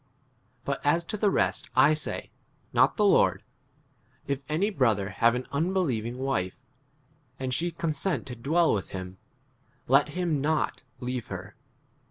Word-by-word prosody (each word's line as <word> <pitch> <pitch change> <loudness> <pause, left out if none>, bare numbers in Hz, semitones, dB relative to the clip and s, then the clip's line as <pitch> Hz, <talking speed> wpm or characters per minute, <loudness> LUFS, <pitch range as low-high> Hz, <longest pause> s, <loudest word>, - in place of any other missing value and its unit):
But 140 -1 -2
as 165 +4 +3
to 170 - -4
the 210 0 +2
rest - - 0
I 135 +4 +6
say, 155 - -3 0.4
not - - +4
the 210 - +3
Lord, 200 - +4 0.8
If 140 -1 -1
any 185 +8 +1
brother 110 - +1
have 115 +5 +3
an 125 - -3
unbelieving 140 - 0
wife, 130 -9 -1 0.8
and 130 -1 -2
she 175 +6 +1
consent 165 +2 -2
to 125 -2 -6
dwell 160 +8 +2
with 100 - -2
13 - - -5
him, 90 0 -9 0.7
let 140 +3 +4
him 165 -2 -1
not 155 +2 0 0.2
leave 125 -1 -3
her. 95 +1 -7
140 Hz, 150 wpm, -27 LUFS, 120-165 Hz, 0.8 s, I